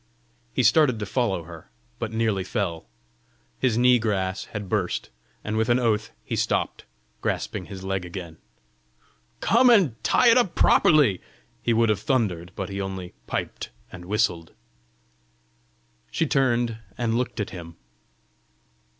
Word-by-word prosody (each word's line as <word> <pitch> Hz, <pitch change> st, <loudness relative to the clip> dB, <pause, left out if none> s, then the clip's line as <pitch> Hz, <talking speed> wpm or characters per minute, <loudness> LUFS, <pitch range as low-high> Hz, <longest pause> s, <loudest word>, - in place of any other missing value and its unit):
He 130 Hz, -, 0 dB
started 125 Hz, +1 st, +4 dB
to 105 Hz, -, -4 dB
follow 100 Hz, -5 st, -1 dB
her, 85 Hz, -1 st, -12 dB, 0.3 s
but 115 Hz, -2 st, -3 dB
nearly 110 Hz, -4 st, 0 dB
fell: 95 Hz, -5 st, -3 dB, 0.7 s
his 125 Hz, -4 st, +1 dB
knee 125 Hz, 0 st, +5 dB
grass 95 Hz, -3 st, -1 dB
had 105 Hz, -2 st, -6 dB
burst, 90 Hz, -, -2 dB, 0.3 s
and 110 Hz, -, -3 dB
with 110 Hz, +1 st, +1 dB
an 120 Hz, -, +4 dB
oath 110 Hz, -4 st, +1 dB, 0.2 s
he -, -, -3 dB
stopped, -, -, -1 dB, 0.4 s
grasping -, -, -2 dB
his 95 Hz, -1 st, -8 dB
leg 95 Hz, -1 st, -2 dB
again. 85 Hz, -2 st, -8 dB, 1.0 s
"Come 245 Hz, +4 st, +5 dB
and 155 Hz, -, +3 dB
tie 245 Hz, -, +4 dB
it 235 Hz, -, +6 dB
up 235 Hz, -8 st, 0 dB
properly!" 140 Hz, -, +4 dB, 0.4 s
he 120 Hz, -, 0 dB
would 115 Hz, 0 st, +3 dB
have 105 Hz, -, +2 dB
thundered, 100 Hz, -, -1 dB
but 95 Hz, -, -4 dB
he 100 Hz, 0 st, -4 dB
only 95 Hz, -2 st, -5 dB
piped -, -, -4 dB, 0.2 s
and 90 Hz, -1 st, -10 dB
whistled! 90 Hz, -5 st, 0 dB, 1.6 s
She 165 Hz, -, 0 dB
turned 120 Hz, -6 st, +1 dB, 0.2 s
and 115 Hz, -2 st, 0 dB
looked 120 Hz, 0 st, -2 dB
at 105 Hz, -, -3 dB
him. 85 Hz, -2 st, -9 dB
110 Hz, 140 wpm, -25 LUFS, 95-120 Hz, 1.6 s, it